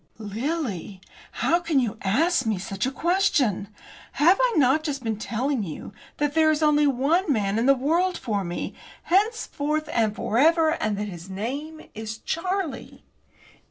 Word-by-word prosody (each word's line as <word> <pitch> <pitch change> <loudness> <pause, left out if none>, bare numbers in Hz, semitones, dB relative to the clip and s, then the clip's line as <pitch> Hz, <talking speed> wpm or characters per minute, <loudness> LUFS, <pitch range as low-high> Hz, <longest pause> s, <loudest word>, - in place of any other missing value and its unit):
"Lily! 215 - -4 0.3
How 340 - +2
can 335 -5 +1
you 225 -3 -2
ask 285 - +1
me 215 -3 +1
such 195 +3 -3
a - - -2
question? 285 - +1 0.5
Have 345 +8 +4
I - - +3
not 275 +2 +4
just 280 -4 -3
been 220 -2 -2
telling 250 +4 -1
you 180 +1 -7 0.2
that 295 -1 0
there 315 0 +4
is 310 0 +1
only 300 -1 +4
one 290 +7 +1
man 210 -3 +1
in 240 - +1
the 275 - +6
world 335 +8 +1
for 205 -4 -2
me, 175 -1 -4 0.3
henceforth 335 -7 0
and 220 -3 +1
for 225 +1 -1
ever, 320 +2 +4
and 215 -10 -1
that 210 +1 -3
his 175 -1 -9
name 280 +11 -5
is 220 0 -6
Charlie?" 360 - -4
275 Hz, 160 wpm, -25 LUFS, 215-320 Hz, 0.5 s, the